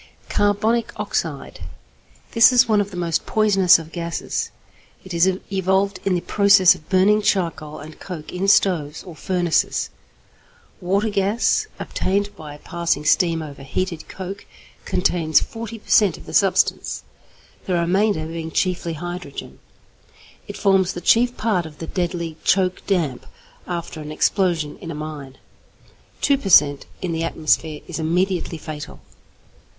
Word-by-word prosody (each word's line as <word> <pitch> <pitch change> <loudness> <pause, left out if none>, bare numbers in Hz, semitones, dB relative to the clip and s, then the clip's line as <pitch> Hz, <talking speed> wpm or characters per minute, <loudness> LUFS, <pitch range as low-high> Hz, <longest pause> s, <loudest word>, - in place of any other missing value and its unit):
=Carbonic 215 +3 +1
Oxide.= - - -3 0.7
This 230 +1 +7
is 245 -1 +5
one 215 -2 +3
of 200 - -3
the 185 - -9
most 170 -2 -1
poisonous 195 -4 +5
of 165 -1 -10
gases. 170 -1 -3 0.6
It 190 - -7
is 170 +2 +4 0.3
evolved 190 +1 +1
in 190 -2 +1
the 175 - -1
process 200 -2 +5
of 155 - -15
burning 200 +3 +4
charcoal 165 -7 -1
and 155 +2 -11
coke 170 -5 -8
in 185 +2 -2
stoves 165 -7 +2
or 175 -4 -11
furnaces. 175 -1 0 0.9
Water 200 +4 0
gas, 210 - +1
obtained 200 +2 -1
by 150 -2 -10
passing 170 -1 -2
steam 165 0 +2
over 140 -2 -10
heated 170 +4 -4
coke, 195 +1 -8 0.4
contains 165 -4 +2
40 230 0 -7
per 215 - -19
cent. 200 -6 +5
of - - -14
the - - -10
substance, 190 -2 +1 0.6
the 185 - 0
remainder 175 0 +1
being 160 0 -5
chiefly 175 0 -1
hydrogen. 175 -2 -7 0.9
It - - -7
forms 195 -1 +2
the 175 - -6
chief 240 +6 +3
part 195 -7 0
of 150 -1 -14
the 165 - -6
deadly 170 -2 -3
'choke 185 -1 +2
damp' 160 -10 -1 0.4
after 170 -2 -5
an 150 0 -7
explosion 165 -2 0
in 165 - -8
a 165 - -5
mine. 150 -3 -7 0.8
Two 280 -2 +3
per 200 - -4
cent. 145 -5 +5 0.2
in 180 - -1
the 165 0 -2
atmosphere 155 -1 0
is 170 -2 -5
immediately 175 +1 0
fatal. 155 -1 -8
180 Hz, 145 wpm, -21 LUFS, 160-195 Hz, 0.9 s, This